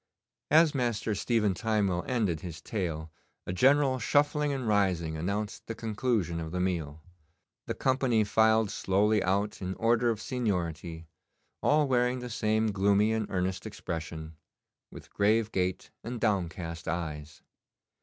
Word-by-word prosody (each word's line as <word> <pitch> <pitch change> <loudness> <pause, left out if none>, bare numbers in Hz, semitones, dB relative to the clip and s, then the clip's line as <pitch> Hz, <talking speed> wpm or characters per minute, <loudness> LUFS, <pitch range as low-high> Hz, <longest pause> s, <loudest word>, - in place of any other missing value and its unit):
As 155 0 +5
Master 120 -5 -1
Stephen 105 -1 +1
Timewell 100 -4 0
ended 105 -11 0
his 85 -4 -7
tale 80 -4 -4 0.3
a 85 - -3
general 135 +5 +4
shuffling 145 +4 +2
and 130 -4 -3
rising 90 -6 +1
announced 100 +6 -3
the 115 - -4
conclusion 110 -6 -1
of 80 -1 -5
the 90 - -2
meal. 80 -5 -2 0.6
The - - -2
company 130 -4 +2
filed 110 0 +3
slowly 105 +2 +2
out 100 +3 0
in 95 0 -3
order 120 +1 +2
of 110 -2 -1
seniority, 85 -9 -3 0.6
all 150 0 +3
wearing 125 -1 +2
the 125 -1 -6
same 110 -1 +1
gloomy 100 +2 +3
and 110 -2 -1
earnest 95 +1 -2
expression, 80 -5 -6 0.5
with - - -13
grave 110 +2 +2
gait 90 -1 -2
and 120 +1 -5
downcast 85 -6 -2
eyes. 75 -2 -4
105 Hz, 135 wpm, -29 LUFS, 90-115 Hz, 0.6 s, As